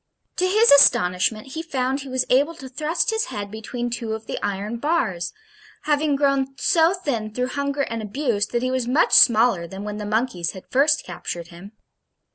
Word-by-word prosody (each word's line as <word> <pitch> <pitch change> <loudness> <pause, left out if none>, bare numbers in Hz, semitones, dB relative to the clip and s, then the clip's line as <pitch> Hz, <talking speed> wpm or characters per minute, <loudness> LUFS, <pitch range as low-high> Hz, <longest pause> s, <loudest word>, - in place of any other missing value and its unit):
To 370 - +2
his 435 +5 +4
astonishment 215 -3 +4
he 320 +4 -5
found 270 -4 -2
he 275 -1 -8
was 255 0 0
able 285 +6 +3
to 270 - -10
thrust 310 - -1
his 445 0 0
head 205 -1 -6
between 240 +3 -5
two 230 -2 -4
of 220 0 -6
the - - -5
iron 205 +3 -3
bars, 235 - -1 0.5
having 295 -1 +1
grown 275 -1 0
so 330 +5 +3
thin 240 - -3
through 250 +3 -2
hunger 280 +1 -2
and 230 -3 -4
abuse, 215 -1 -1
that 240 0 -2
he 255 - 0
was 255 -2 -1
much 275 +7 +2
smaller 225 -7 +5
than 195 +3 -8
when 210 0 -5
the 210 - -5
monkeys 215 -6 -1
had 190 - -10
first 290 +4 +2
captured 170 -1 -7
him. 190 +4 -13
250 Hz, 190 wpm, -22 LUFS, 215-285 Hz, 0.5 s, smaller